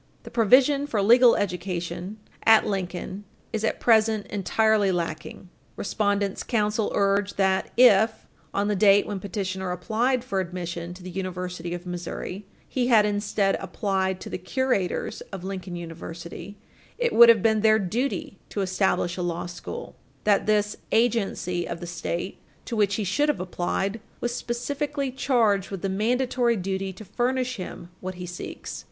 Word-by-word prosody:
The - - -10
provision 265 +5 +4
for 225 -7 -1
legal 240 +3 +7
education 180 0 -3 0.3
at 220 -1 +6
Lincoln 190 0 -3 0.3
is 220 -1 -1
at 220 - 0
present 220 -2 +3
entirely 210 0 +2
lacking. 175 +1 -4 0.3
Respondents' 200 -1 -1
counsel 215 -2 0
urge 200 0 +1
that, 190 -1 +1
if, 220 -2 +5 0.3
on 200 +1 0
the 210 - +1
date 200 0 +5
when 205 -2 -4
petitioner 190 -1 -3
applied 230 +8 0
for 200 -6 -2
admission 175 -1 -4
to 180 - -13
the 185 - -7
University 180 -2 -4
of 175 +1 -8
Missouri, 180 +2 -5 0.2
he 250 -2 0
had 220 -4 +6
instead 205 -1 +1
applied 190 0 -1
to - - -7
the - - -3
curators 200 -1 -1
of 190 -3 -6
Lincoln 190 -2 -5
University, 170 +3 -8 0.4
it 480 -2 0
would 235 0 +9
have 225 -4 +6
been 220 -1 +3
their 220 0 +5
duty 220 +1 -2
to 205 - -2
establish 190 -1 0
a - - -2
law 175 0 -2
school; 180 - -7 0.3
that 205 -1 +3
this 210 -1 +2
"agency 200 -6 +1
of 170 - -5
the 175 - -6
State," 175 +2 -4 0.3
to 235 - -4
which 205 -2 +2
he 215 - -1
should 290 +11 +1
have 295 - 0
applied, 190 +3 -2 0.2
was 240 0 -2
"specifically 275 +4 -2
charged 225 -7 +2
with 195 -2 -6
the 195 - 0
mandatory 240 +4 +1
duty 190 0 -2
to 190 +4 -11
furnish 255 +4 -1
him 180 -2 -7
what 185 0 -5
he 180 0 -6
seeks." 180 0 -7
200 Hz, 160 wpm, -25 LUFS, 185-225 Hz, 0.4 s, would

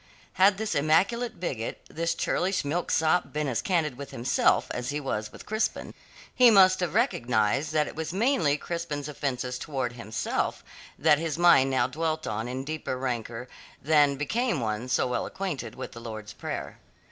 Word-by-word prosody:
Had 190 +1 +5
this 220 0 -2
immaculate 185 +10 +1
bigot, 125 -10 -4
this 165 +1 -2
churlish 185 -1 0
milksop 160 +2 +1
been 150 0 -1
as 125 -4 -1
candid 155 -8 0
with 140 - -7
himself 120 +1 +2
as 125 - -3
he 145 +1 -1
was 110 -7 -3
with - - -12
Crispin, 215 +1 -2 0.4
he 250 -1 +7
must 190 -3 +6
have 180 -4 -2
recognized 120 +4 +1
that 155 -1 +3
it - - -8
was 160 0 -4
mainly 190 - +2
Crispin's 150 -3 -4
offences 125 -4 -3
towards 130 -5 -3
himself 110 -2 -2 0.3
that 150 - +4
his 160 -2 -2
mind 170 -6 +6
now 130 -2 +2
dwelt 155 +4 -2
on 110 +2 -3
in 130 +2 -4
deeper 150 -3 -4
rancour 120 -1 -4 0.3
than 145 -1 +4
became 220 - 0
one 110 +1 -3
so - - +2
well 125 -1 -1
acquainted 145 - -4
with - - -7
the 115 - -10
Lord's 110 -2 -7
Prayer. - - -6
145 Hz, 170 wpm, -27 LUFS, 125-170 Hz, 0.4 s, he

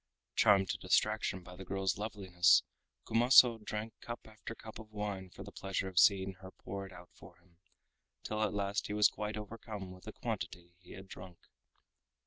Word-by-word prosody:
Charmed 100 -3 +5
to - - -2
distraction 105 -4 +1
by 90 0 -11
the 95 - -9
girl's 95 -1 -1
loveliness 95 -5 +3 0.4
Kumaso 120 0 +6
drank 105 +1 -4
cup 120 0 -6
after 110 +1 -9
cup 110 -1 -10
of 110 -1 -11
wine 100 -3 -4
for - - -10
the - - -10
pleasure 95 0 -3
of 95 -2 +1
seeing 95 -1 +4
her 95 - -9
pour 100 0 -7
it - - -15
out 90 -1 -13
for 90 - -15
him, 85 -1 -29 0.6
till 110 0 -3
at 105 -3 +1
last 100 0 -1
he - - -4
was 105 0 +6
quite 105 +1 -4
overcome 105 -2 -7
with 90 0 -13
the - - -7
quantity 85 0 -5
he 90 - -13
had 95 +1 -10
drunk. 90 -2 -10
100 Hz, 185 wpm, -34 LUFS, 95-110 Hz, 0.6 s, Kumaso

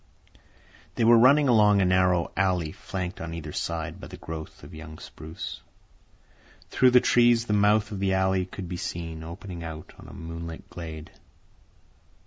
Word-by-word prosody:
They 120 - 0
were 120 +1 +7
running 140 +4 +6
along 105 -4 +5
a 95 - +3
narrow 90 -1 +2
alley 90 -5 +1
flanked 90 +2 -6
on 85 0 -5
either 80 -2 -6
side 85 -2 -4
by - - -8
a - - -9
growth 80 -1 -8
of - - -12
young 80 0 -10
spruce. 80 +1 -8 1.1
Through 130 - +5
the 125 0 +6
trees 120 -1 +4
the 105 - -1
mouth 105 +1 +3
of 100 - -5
the 95 -1 +1
alley 95 -1 +1
could 95 -1 -7
be 90 0 -5
seen, 85 -2 -5
opening 85 +1 -8
out 80 -1 -8
on - - -12
a - - -11
moonlit 85 0 -8
glade. 80 -2 -8
90 Hz, 165 wpm, -26 LUFS, 80-105 Hz, 1.1 s, were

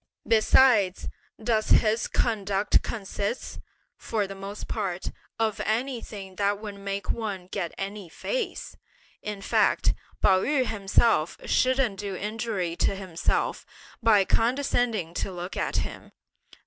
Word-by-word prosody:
Besides, 220 -3 +4 0.3
does 220 -1 0
his 220 +1 +4
conduct 205 -3 +1
consist, 205 +2 -4 0.4
for 215 -3 -1
the 195 - -7
most 195 +1 -7
part, 190 -5 -3 0.3
of 220 -2 0
anything 215 -5 -3
that 200 0 +2
would 210 -1 -6
make 200 -1 -3
one 205 -5 -3
get 180 -2 -3
any 195 -2 -5
face? - - -3 0.5
In 210 -2 -5
fact, - - +3 0.3
Pao 190 -2 +4
yü 275 0 +2
himself 200 -5 +2
shouldn't 255 -6 +2
do 200 -2 -4
injury 210 -4 -2
to - - +2
himself 185 -4 -1 0.4
by 215 -4 +5
condescending 230 - +1
to 195 - -2
look 180 +1 -6
at - - -1
him. - - -4
205 Hz, 120 wpm, -27 LUFS, 195-225 Hz, 0.5 s, by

